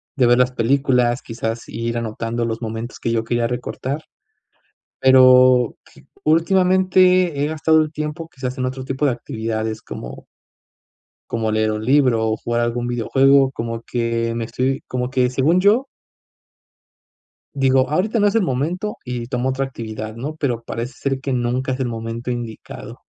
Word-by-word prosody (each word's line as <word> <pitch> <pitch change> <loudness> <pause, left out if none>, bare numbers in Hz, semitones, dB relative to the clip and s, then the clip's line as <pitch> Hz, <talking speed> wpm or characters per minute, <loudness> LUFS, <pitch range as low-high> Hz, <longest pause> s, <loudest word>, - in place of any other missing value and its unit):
de 130 - +3
ver 120 +1 +5
las 125 0 +3
películas, 125 0 +1
quizás 115 0 -5
ir 115 0 -3
anotando 115 +1 -3
los 115 +1 -3
momentos 115 +2 -5
que 115 - -2
yo 115 -1 0
quería 120 0 0
recortar, 130 +4 -4 1.0
pero 130 -2 +6 0.5
últimamente 185 -1 +3
he - - +2
gastado 160 0 +3
el 155 0 -4
tiempo 155 +2 -5
que 135 - -23
se 130 - -2
hacen 130 0 -3
otro 130 0 -4
tipo 135 +2 -2
de 135 - +3
actividades 110 -1 -4
como 65 +2 -8 1.1
como 110 -2 -1
leer 110 0 +1
un 105 0 -3
libro 125 -5 +3
o 110 - -1
jugar 120 0 -1
algún 120 +1 -1
videojuego, 135 +3 +3
como 115 -1 -4
que 115 -1 -1
me 115 -1 -2
estoy 130 +3 -1
como 125 0 -2
que 125 -2 +1
según 145 +8 +2
yo 215 +8 +3 1.7
digo, 135 -1 +2
ahorita 210 +9 +1
no 205 - +4
es 205 - 0
el 225 - +4
momento 170 +9 -2
y 120 -1 -4
tomo 125 0 -1
otra 135 +1 -1
actividad, 110 -3 -7
¿no? 145 +6 -5
Pero 125 -6 -2
parece 115 +2 -5
ser 135 -1 -2
que 135 - -3
nunca 125 +2 -1
es 130 - -3
el 130 - 0
momento 115 +1 -5
indicado. 120 -2 -7
125 Hz, 165 wpm, -20 LUFS, 115-140 Hz, 1.7 s, pero